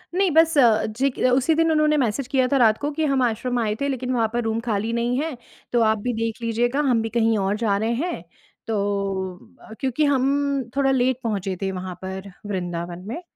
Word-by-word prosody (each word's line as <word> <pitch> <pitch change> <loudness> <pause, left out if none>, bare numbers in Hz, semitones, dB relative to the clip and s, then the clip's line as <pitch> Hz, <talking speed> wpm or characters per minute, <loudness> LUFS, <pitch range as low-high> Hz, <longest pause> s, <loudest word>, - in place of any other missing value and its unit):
नहीं 380 -2 +2
बस 320 0 +4
अ, 230 -5 +5
जे 255 +6 0
क - - -2
उसी 270 +5 +2
दिन 325 0 +3
उन्होंने 305 -1 +3
मैसेज 250 0 0
किया 260 -2 +3
था 275 +1 +2
रात 220 -3 +4
को 290 - -2
कि 315 - +1
हम 265 -1 +2
आश्रम 245 +1 -1
आए 215 -2 0
थे 280 - +1
लेकिन 255 -2 -2
वहाँ 230 -2 +2
पर 240 - 0
रूम 225 0 -1
खाली 215 +1 0
नहीं 240 +2 0
हैं। 305 -4 -3 0.4
तो 240 - +3
आप 220 0 +3
भी 245 - +1
देख 225 +1 -3
लीजिएगा 240 +4 0
हम 230 -3 +3
भी 225 - -3
कहीं 225 -1 +2
और 195 +1 0
जा 200 -2 +2
रहे 225 +3 0
हैं। 350 - -4 0.4
तो 225 - -1 0.9
अ, 220 - -12
क्योंकि 265 +3 0
हम 280 -1 +1
थोड़ा 275 -1 +2
लेट 255 -1 +2
पहुँचे 195 -4 -2
थे 195 -1 -1
वहाँ 185 -1 -6
पर 190 +1 -6 0.2
वृंदावन 175 -1 -4
में 320 +10 -5
235 Hz, 220 wpm, -23 LUFS, 215-275 Hz, 0.9 s, अ